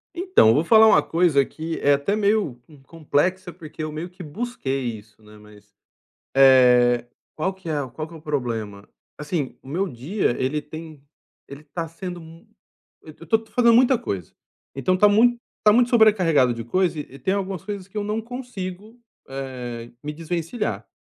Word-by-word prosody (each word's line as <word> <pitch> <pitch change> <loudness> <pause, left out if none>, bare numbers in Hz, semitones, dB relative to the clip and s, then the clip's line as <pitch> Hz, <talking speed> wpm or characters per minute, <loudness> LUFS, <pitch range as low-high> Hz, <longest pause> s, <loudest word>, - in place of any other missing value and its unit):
Então, 360 - +4
vou 150 +7 +2
falar 220 +4 +6
uma - - +6
coisa 165 -5 +2
que 160 +3 -6
é 145 - +4
até 140 +9 0
meio, 205 - 0
hum, 145 -3 -17
complexa, 165 +5 -1
porque 155 -2 -10
eu 155 - -4
meio 155 +4 -6
que 180 +1 -14
busquei 155 - -4 0.2
isso, 110 +1 -22
né, 105 0 -16
mas, 105 -1 -18 0.6
eh, 125 -3 +5 0.3
qual 185 +5 -1
que 190 -3 -11
é 145 -4 -2
qual 155 +6 -6
que 170 - -13
é - - -9
o 160 - -12
problema, 115 -9 -4 0.3
assim, 150 -2 -4
o - - -15
meu 180 +8 -1
dia 145 - -2
ele 140 +4 0
tem 155 0 -10 0.5
ele 140 +1 -10
tá 160 +3 -5
sendo 175 +2 -7
mu 165 +5 -15 0.5
eu 155 - -13
tô 220 +7 +2
tô 220 -1 -19
fazendo 235 -1 +4
muita 250 +2 +5
coisa, 95 - -5 0.4
então 135 +7 +1
tá 210 +3 +5
mui 235 +3 +4 0.2
tá 210 - +6
muito 245 +1 +4
sobrecarregado 185 - +4
de 115 0 -6
coisa 170 +6 0
e 150 - -6
e 135 - -12
tem 190 - 0
algumas 195 -3 -3
coisas 200 -2 -6
que 200 - -10
eu 210 - -1
não 210 +2 -2
consigo, 225 -3 -8 0.3
eh, 125 -3 -7
me 150 +1 -4
desvencilhar, 170 +7 -4
165 Hz, 185 wpm, -23 LUFS, 135-200 Hz, 0.6 s, falar